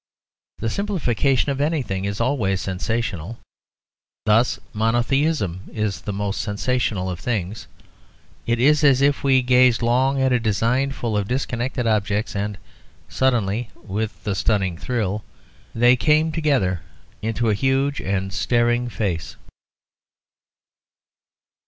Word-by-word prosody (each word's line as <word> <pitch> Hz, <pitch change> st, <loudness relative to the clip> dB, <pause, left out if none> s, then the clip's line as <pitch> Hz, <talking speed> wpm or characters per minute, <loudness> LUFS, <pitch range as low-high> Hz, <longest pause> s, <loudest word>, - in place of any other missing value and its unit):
The 115 Hz, -, -2 dB
simplification 145 Hz, -, 0 dB
of 140 Hz, 0 st, -2 dB
anything 130 Hz, -, -1 dB
is 100 Hz, 0 st, -3 dB
always 115 Hz, -7 st, +1 dB
sensational. 100 Hz, +1 st, -3 dB, 0.9 s
Thus 110 Hz, +4 st, +3 dB
monotheism 115 Hz, -, 0 dB
is 105 Hz, -5 st, -2 dB
the -, -, -4 dB
most 100 Hz, 0 st, -2 dB
sensational 105 Hz, -2 st, -1 dB
of 90 Hz, -2 st, -4 dB
things: 105 Hz, -3 st, -3 dB, 0.8 s
it 115 Hz, 0 st, +1 dB
is 150 Hz, +4 st, +4 dB
as 140 Hz, -2 st, +5 dB
if 140 Hz, 0 st, +2 dB
we 135 Hz, -2 st, +4 dB
gazed 125 Hz, -1 st, +4 dB
long 130 Hz, +3 st, +2 dB
at 130 Hz, -1 st, +2 dB
a 125 Hz, -, +3 dB
design 115 Hz, +5 st, +1 dB
full 120 Hz, -4 st, -3 dB
of 100 Hz, -1 st, 0 dB
disconnected 125 Hz, 0 st, -2 dB
objects, 105 Hz, -1 st, 0 dB
and, 100 Hz, 0 st, -2 dB, 0.5 s
suddenly, 120 Hz, -3 st, 0 dB
with 105 Hz, +2 st, -5 dB
a 105 Hz, -, 0 dB
stunning 95 Hz, -1 st, 0 dB
thrill, 105 Hz, 0 st, -2 dB, 0.5 s
they 120 Hz, +2 st, +5 dB
came 155 Hz, +4 st, +2 dB
together 135 Hz, -, +1 dB, 0.4 s
into 115 Hz, +1 st, 0 dB
a -, -, +3 dB
huge 135 Hz, +5 st, +1 dB
and 95 Hz, 0 st, -2 dB
staring 120 Hz, +1 st, +1 dB
face. 95 Hz, -8 st, -3 dB
115 Hz, 120 wpm, -22 LUFS, 100-130 Hz, 0.9 s, as